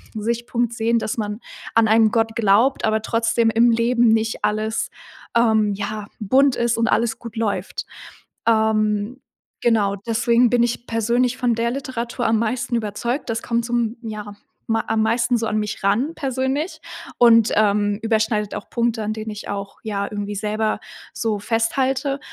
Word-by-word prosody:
Sichtpunkt 235 +2 -1
sehen, 230 0 +1
dass 225 0 -2
man 210 -1 -3 0.4
an 225 -1 +5
einen 220 0 +5
Gott 225 0 0
glaubt, 230 +5 +3
aber 220 0 +1
trotzdem 230 +1 +1
im 230 +2 +4
Leben 235 +1 +3
nicht 220 0 +1
alles, 215 +1 -1 0.5
ähm, 220 -3 +3
ja, 205 +1 -4
bunt 260 +5 +3
ist 235 -1 0
und 230 0 +1
alles 230 +1 +1
gut 230 -1 -9
läuft. 220 -3 -2 0.6
Ähm, 220 +1 +1 0.4
genau, 215 -4 +2
deswegen 235 +1 +3
bin 240 0 +3
ich 240 0 -2
persönlich 240 +2 +1
von 245 -2 +1
der 235 +1 0
Literatur 245 -2 -4
am 225 0 +2
meisten 240 +2 -1
überzeugt. 235 +5 -2
Das 225 0 -1
kommt 235 0 -1
zum, 235 -1 -1
ja, 210 -3 -7 0.3
ma 225 0 +1
am 220 0 +2
meisten 230 +2 +2
so 225 0 -2
an 215 - 0
mich 210 -1 -4
ran 225 +11 +1
persönlich 270 +4 -2 0.4
und, 230 -2 +6
ähm, 205 -1 +2
überschneidet 220 -2 0
auch - - -7
Punkte, 235 -1 0
an 215 +1 -2
denen 220 0 -5
ich 210 0 -8
auch, 200 0 -5
ja, 200 -2 -2
irgendwie 205 0 -4
selber 215 +1 -1 0.3
so 220 -3 -1
festhalte 260 +6 0
225 Hz, 160 wpm, -21 LUFS, 215-235 Hz, 0.6 s, und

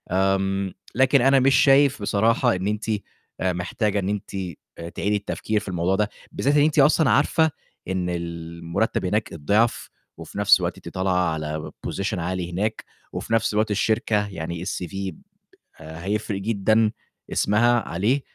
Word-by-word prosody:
آمم، 95 0 +1 0.2
لكن 130 +1 +4
أنا 135 +1 +5
مش 135 +1 +4
شايف 140 -3 +5
بصراحة 115 +3 +2
إن 95 +2 -2
أنتِ 105 +1 -2 0.5
آآ 95 -1 +1
محتاجة 100 +4 -1
إن 95 0 -2
أنتِ 100 -1 -4 0.4
آآ 85 0 -6
تعيدي 105 +4 -1
التفكير 105 +1 -2
في 105 - -11
الموضوع 90 +1 0
ده. 105 +1 0 0.2
بالذات 145 +2 +1
إن 145 - +5
أنتِ 155 0 +2
أصلًا 150 0 +5
عارفة 160 +8 +3 0.4
إن 95 -1 -1
المُرتَّب 85 +4 -3
هناك 105 +4 -1
الضِعف 105 +9 +1 0.3
وفي - - -10
نَفْس 105 0 +6
الوقت - - -2
أنتِ - - -9
طالعة 90 -2 +1
على 75 0 -4 0.2
Position 100 +1 -2
عالي 90 0 -3
هناك 105 +5 -2 0.3
وفي - - -4
نَفْس 115 -1 +2
الوقت 110 +1 +1
الشركة 105 0 +1
يعني 85 -3 -5
الCV 95 +1 -4 0.7
آآ 80 +2 -9
هيفرق 100 -1 -2
جدًا 110 +1 +2 0.4
اسمها 120 +3 +3
عليه، 105 +11 +1
100 Hz, 155 wpm, -23 LUFS, 90-110 Hz, 0.7 s, نَفْس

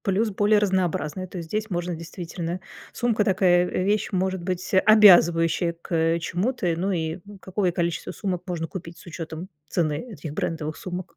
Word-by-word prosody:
Плюс 205 +3 +1
более 205 +2 +3
разнообразные. 185 -3 -1
То 185 - -9
есть 165 -2 -7
здесь 215 +3 -2
можно 175 -1 -2
действительно 170 +1 -5 0.3
сумка 230 -3 +1
такая, 180 -2 +3
э, 185 - -1
вещь 205 +2 +1
может 190 -1 -1
быть 180 +1 -4
обязывающая 175 -5 +6
к, - - -15
э, 165 +1 +2
чему-то. 180 +2 -1
Ну 185 +4 -1
и 165 -1 -2 0.2
какое 190 -1 -1
количество 170 -1 -2
сумок 185 -4 -3
можно 170 -2 -3
купить 170 -2 -8
с - - -15
учётом 165 0 -7 0.2
цены 155 -4 0
этих 160 -6 -7
брендовых 155 0 -3
сумок? 185 0 -7
180 Hz, 165 wpm, -24 LUFS, 165-190 Hz, 0.3 s, обязывающая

